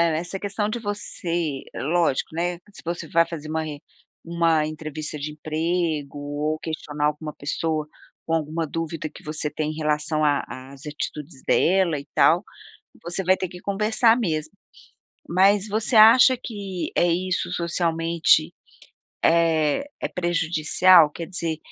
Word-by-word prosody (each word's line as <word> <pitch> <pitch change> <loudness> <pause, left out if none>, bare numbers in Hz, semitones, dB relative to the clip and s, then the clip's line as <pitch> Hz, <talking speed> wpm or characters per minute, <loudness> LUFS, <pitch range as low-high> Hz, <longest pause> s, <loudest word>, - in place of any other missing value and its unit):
essa 175 +4 -3
questão 205 +1 -2
de 225 - -2
você 175 -8 -3
lógico, 165 -1 0
né, 175 +1 -1
se - - -12
você 170 0 -4
vai 170 0 +4
fazer 155 -2 -7
uma 160 0 -2
en 150 -2 -6 0.5
uma 165 -2 +2
entrevista 155 0 -5
de 150 +1 -5
emprego 155 -1 -2
ou 145 +2 -3
questionar 150 -2 -3
alguma 150 0 -4
pessoa, 155 +1 -2 0.4
com 165 - -2
alguma 160 +1 -1
dúvida 165 0 -4
que - - -14
você 150 0 -2
tem, 155 0 -3
em - - -8
relação 155 0 0
a 145 -1 +2 0.3
as 140 +2 -13
atitudes 150 -2 -6
dela 180 -3 +3
e 140 - -11
tal, 175 +4 +4 0.6
você 175 +3 -2
vai 185 +1 +4
ter 185 - -3
que 180 - -10
conversar 220 +3 +3
mesmo. 160 -8 -2 0.8
Mas 195 +3 +4
você 220 +3 +1
acha 235 +4 +8
que, 200 -5 -5
eh, 175 - +3
isso 185 +1 -1
socialmente 170 -1 +1 0.7
é 165 - +3 0.2
é - - 0
prejudicial? 175 -1 +4
Quer 165 +2 -7
dizer, 165 -4 -3
165 Hz, 145 wpm, -23 LUFS, 155-180 Hz, 0.8 s, acha